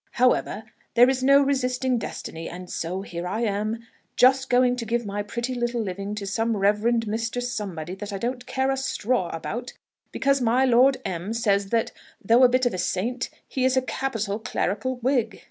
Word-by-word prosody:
However, 245 Hz, -3 st, +2 dB, 0.3 s
there 245 Hz, +2 st, +7 dB
is 260 Hz, -1 st, -2 dB
no 275 Hz, +2 st, +6 dB
resisting 255 Hz, -2 st, 0 dB
destiny; 165 Hz, -5 st, -6 dB
and 180 Hz, +1 st, -9 dB
so 180 Hz, +4 st, -3 dB
here 175 Hz, -2 st, -5 dB
I 215 Hz, +5 st, -2 dB
am, 215 Hz, +1 st, -1 dB, 0.3 s
just 260 Hz, +1 st, +4 dB
going 250 Hz, 0 st, +4 dB
to 235 Hz, -, -4 dB
give 235 Hz, +1 st, 0 dB
my 205 Hz, 0 st, -3 dB
pretty 235 Hz, +5 st, -3 dB
little 240 Hz, -1 st, -1 dB
living 200 Hz, 0 st, -4 dB
to 205 Hz, -1 st, -5 dB
some 225 Hz, +3 st, 0 dB
Reverend 210 Hz, +4 st, +2 dB
Mr. 225 Hz, +3 st, -2 dB
Somebody 200 Hz, -9 st, -4 dB
that 205 Hz, +2 st, -7 dB
I 200 Hz, -, -3 dB
don't 245 Hz, +4 st, -4 dB
care 265 Hz, 0 st, 0 dB
a 270 Hz, -, -1 dB
straw 250 Hz, -7 st, -1 dB
about, 235 Hz, +10 st, -5 dB, 0.4 s
because 275 Hz, 0 st, +1 dB
my 245 Hz, +2 st, +3 dB
Lord 260 Hz, +2 st, +5 dB
M 185 Hz, +2 st, -3 dB
says, 200 Hz, -4 st, +1 dB
that 230 Hz, 0 st, +1 dB, 0.3 s
though 230 Hz, +5 st, +4 dB
a 250 Hz, -, +8 dB
bit 255 Hz, +1 st, +2 dB
of 245 Hz, -, +1 dB
a 185 Hz, -, -3 dB
saint, 235 Hz, +8 st, -1 dB, 0.2 s
he 260 Hz, -, -2 dB
is 260 Hz, 0 st, +3 dB
a -, -, +4 dB
capital 225 Hz, -6 st, -2 dB
clerical 220 Hz, +3 st, -2 dB
Whig. 240 Hz, -5 st, +1 dB
235 Hz, 190 wpm, -25 LUFS, 200-255 Hz, 0.4 s, a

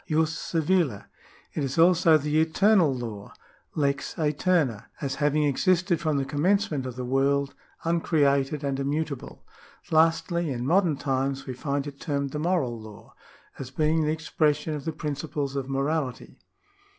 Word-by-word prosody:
jus 160 Hz, 0 st, +2 dB
civile). 165 Hz, -, 0 dB, 0.5 s
It 150 Hz, -, -2 dB
is 135 Hz, +2 st, -3 dB
also 170 Hz, -1 st, +5 dB
the 150 Hz, +1 st, +1 dB
Eternal 180 Hz, 0 st, +4 dB
Law 115 Hz, -6 st, -6 dB, 0.4 s
(lex 140 Hz, -2 st, -1 dB
aeterna), 150 Hz, -, +1 dB
as 140 Hz, -2 st, -2 dB
having 150 Hz, +1 st, +2 dB
existed 175 Hz, +4 st, +2 dB
from 155 Hz, -3 st, 0 dB
the 135 Hz, -, 0 dB
commencement 155 Hz, -1 st, 0 dB
of 125 Hz, -, -6 dB
the 125 Hz, 0 st, -4 dB
world, 140 Hz, +2 st, +1 dB, 0.3 s
uncreated 150 Hz, -4 st, +1 dB
and 140 Hz, -1 st, -1 dB
immutable. 140 Hz, 0 st, -3 dB, 0.5 s
Lastly, 165 Hz, +1 st, +2 dB
in 125 Hz, -2 st, -3 dB
modern 170 Hz, -1 st, +2 dB
times 135 Hz, -1 st, -1 dB
we 130 Hz, -, -5 dB
find 140 Hz, +2 st, -2 dB
it 140 Hz, -1 st, -8 dB
termed 140 Hz, -2 st, -2 dB
the 150 Hz, -, -4 dB
Moral 150 Hz, -9 st, 0 dB
Law, 110 Hz, 0 st, -13 dB, 0.5 s
as 130 Hz, -, -6 dB
being 155 Hz, +3 st, +1 dB
the 150 Hz, -, +1 dB
expression 155 Hz, -1 st, 0 dB
of 145 Hz, -2 st, -5 dB
the 160 Hz, -, -1 dB
principles 150 Hz, -2 st, -4 dB
of 135 Hz, -1 st, -3 dB
morality. 135 Hz, -1 st, -2 dB
150 Hz, 150 wpm, -26 LUFS, 135-160 Hz, 0.5 s, also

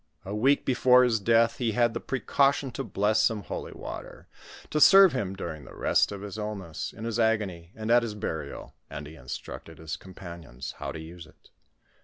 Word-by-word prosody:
A 100 Hz, -, -5 dB
week 135 Hz, +7 st, +2 dB
before 125 Hz, 0 st, +5 dB
his 120 Hz, -3 st, +2 dB
death, 115 Hz, +2 st, +3 dB
he 120 Hz, -5 st, 0 dB
had 120 Hz, 0 st, +2 dB
the 115 Hz, -, -3 dB
precaution 135 Hz, +1 st, +1 dB
to -, -, -4 dB
bless 105 Hz, +2 st, +1 dB
some 110 Hz, -3 st, +1 dB
holy -, -, -6 dB
water, -, -, -9 dB, 0.4 s
to 150 Hz, -, +1 dB
serve 195 Hz, +1 st, +8 dB
him 100 Hz, -7 st, -2 dB
during 80 Hz, -6 st, -6 dB
the -, -, -12 dB
rest -, -, +2 dB
of 100 Hz, -1 st, -6 dB
'jis 105 Hz, +1 st, -6 dB
illness, 100 Hz, -7 st, -5 dB
in 110 Hz, -, -10 dB
his 115 Hz, 0 st, -2 dB
agony, 100 Hz, -7 st, 0 dB
and 110 Hz, +1 st, -3 dB
at 120 Hz, 0 st, +6 dB
his 115 Hz, -3 st, -4 dB
burial, 80 Hz, -9 st, -5 dB, 0.2 s
and 75 Hz, -, -7 dB
he 75 Hz, -, -10 dB
instructed 80 Hz, +4 st, -8 dB
his 80 Hz, -1 st, -5 dB
compan 85 Hz, -2 st, -10 dB
ions 65 Hz, -3 st, -8 dB
how -, -, -4 dB
to 80 Hz, -, -7 dB
use 80 Hz, +1 st, -10 dB
it. -, -, -23 dB
105 Hz, 200 wpm, -27 LUFS, 85-120 Hz, 0.4 s, serve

